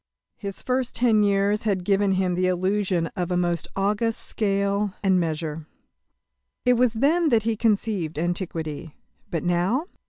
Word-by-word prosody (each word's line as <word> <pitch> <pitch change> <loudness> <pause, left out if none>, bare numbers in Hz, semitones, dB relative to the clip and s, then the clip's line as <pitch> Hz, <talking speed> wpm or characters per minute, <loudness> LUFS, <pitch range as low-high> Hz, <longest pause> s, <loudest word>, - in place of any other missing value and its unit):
His 200 -2 -6
first 255 -1 -1
ten 230 -3 +3
years 200 +1 +2
had 195 -4 -1
given 195 0 +2
him 185 -1 +1
the 185 +1 +1
illusion 185 -1 0
of 180 -3 -2
a 180 - 0
most 175 -2 0
august 210 +3 0
scale 200 -1 0
and 190 -2 +3
measure. 160 -2 -3 1.0
It 250 - +5
was 245 -1 +2
then 305 +8 +2
that 230 -4 +3
he 225 0 0
conceived 205 -7 0
Antiquity. 165 -3 -3 0.3
But 165 - -2
now! 180 - +1
195 Hz, 150 wpm, -24 LUFS, 175-220 Hz, 1.0 s, It